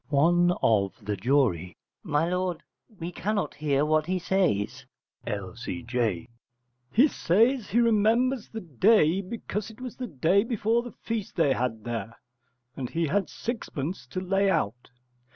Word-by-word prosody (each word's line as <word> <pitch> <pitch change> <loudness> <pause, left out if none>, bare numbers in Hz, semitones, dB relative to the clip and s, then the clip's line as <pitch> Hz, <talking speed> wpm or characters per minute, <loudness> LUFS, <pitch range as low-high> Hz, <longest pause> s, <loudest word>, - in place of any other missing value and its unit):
One 175 +5 +4
of 100 -2 +1
the 105 0 -1
Jury. 100 - +1 0.2
My 155 -2 0
lord, 180 -1 -2 0.4
we 170 +1 -4
cannot 205 +3 -2
hear 145 -1 +1
what 155 0 +2
he 185 +1 0
says. 155 - 0 0.4
L.C.J. 115 0 -3 0.6
He 255 +8 +6
says 230 - +2
he 230 - +2
remembers 230 +2 +2
the 225 - -6
day 180 - +3
because 210 +1 -5
it 220 +2 -14
was 255 -2 -7
the 255 - -4
day 170 - +2
before 230 0 +1
the 245 0 -10
feast 225 -3 -3
they 145 -5 +3
had 115 -4 -2
there, 115 -1 -5 0.6
and 130 -3 -4
he 165 0 0
had 190 +5 0
sixpence 190 - -5
to 185 - -4
lay 195 +2 +1
out. 125 - -1
175 Hz, 145 wpm, -27 LUFS, 125-210 Hz, 0.6 s, He